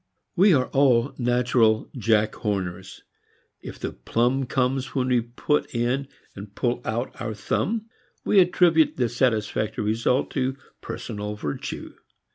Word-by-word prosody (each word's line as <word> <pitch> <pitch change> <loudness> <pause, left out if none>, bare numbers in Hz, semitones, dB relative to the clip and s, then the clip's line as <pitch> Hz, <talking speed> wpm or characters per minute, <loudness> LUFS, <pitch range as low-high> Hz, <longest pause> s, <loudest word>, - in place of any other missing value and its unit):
We 195 +3 +6
are 130 -2 +2
all 135 -1 +3
natural 120 -2 +2
Jack 110 -2 +2
Horners. 95 -3 -4 0.6
If - - -8
the - - -4
plum 125 +3 0
comes 130 +2 -1
when 130 -1 0
we 125 -2 +3
put 120 +5 -2
in 125 +4 0 0.3
and 100 0 -10
pull 120 0 -1
out 120 +2 -4
our 110 -2 -3
thumb 215 - -1 0.4
we 205 - +5
attribute 175 -3 +4
the 125 -2 +2
satisfactory 110 -3 0
result 115 +5 +1
to 130 -1 -1 0.2
personal 105 -2 -5
virtue. 75 -8 -5
120 Hz, 130 wpm, -24 LUFS, 110-135 Hz, 0.6 s, We